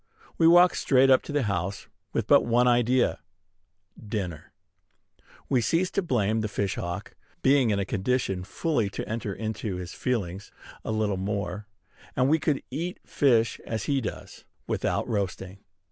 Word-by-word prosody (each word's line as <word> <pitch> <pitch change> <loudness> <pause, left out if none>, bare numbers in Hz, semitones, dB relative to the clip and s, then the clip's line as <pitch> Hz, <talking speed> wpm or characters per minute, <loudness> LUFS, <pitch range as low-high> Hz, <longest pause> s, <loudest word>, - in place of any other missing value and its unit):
We 165 - +6
walk 175 +2 +7
straight 135 0 +4
up 130 - +6
to - - -8
the 145 -2 +1
house, 100 -1 -2 0.3
with - - -1
but - - +5
one 120 +1 +3
idea, 120 +1 +2 0.8
dinner. 100 -7 -5 1.0
We 130 -3 +2
cease 170 - +1
to 200 - 0
blame 110 - 0
the 110 - -1
fish 100 -2 -2
hawk, 85 +3 -5 0.3
being 135 -3 +4
in 105 - +1
a 100 - -1
condition 100 -2 -1
fully 115 - -1
to - - -4
enter 110 -1 -3
into 110 -1 -4
his 90 -1 -6
feelings: 100 -6 -3 0.3
a - - -3
little 105 -3 0
more, 100 0 -3 0.5
and 130 0 +3
we 160 +2 +4
could 150 -2 0
eat 170 +7 -4
fish 115 -5 +2
as 110 -1 -3
he 140 -2 0
does, 110 - -7 0.2
without - - -1
roasting. 95 -2 -3
110 Hz, 160 wpm, -27 LUFS, 100-130 Hz, 1.0 s, walk